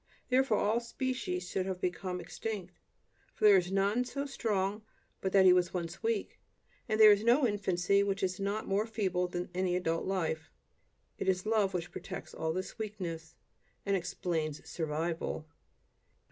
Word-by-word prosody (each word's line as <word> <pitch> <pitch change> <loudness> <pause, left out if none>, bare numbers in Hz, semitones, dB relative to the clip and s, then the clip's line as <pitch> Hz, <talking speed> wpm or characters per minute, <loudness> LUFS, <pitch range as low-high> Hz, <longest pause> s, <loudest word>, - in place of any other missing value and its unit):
Therefore, 255 -4 +3
all 215 +4 +2
species 235 -7 -3
should 190 0 -2
have 185 -1 -3
become 180 0 -2
extinct, 180 +1 -6 0.6
for - - -8
there 205 -1 +9
is 180 0 0
none 200 +5 +2
so 280 +3 -4
strong 210 -6 -1 0.4
but 190 - -1
that 195 -1 +6
he 180 - +9
once 180 -1 +2
was 175 -2 -4
weak; 450 -2 -1 0.5
and 215 0 +1
there 215 -1 +10
is 205 +1 +3
no 245 +4 +5
infancy 200 -3 +2
which 200 -1 -1
is 185 +1 -1
not 200 +2 -2
more 200 +3 +1
feeble 190 -5 0
than 175 0 -4
any 180 0 0
adult 165 -2 0
life. 160 -5 -1 0.7
It - - 0
is 185 0 0
love 215 -3 +2
which 175 -1 -3
protects - - -7
all 160 0 -2
this 185 +6 -5
weakness, 175 -7 -5 0.5
and 200 -1 +2
explains 165 -4 -2
"survival." 160 0 -2
190 Hz, 160 wpm, -32 LUFS, 175-215 Hz, 0.7 s, there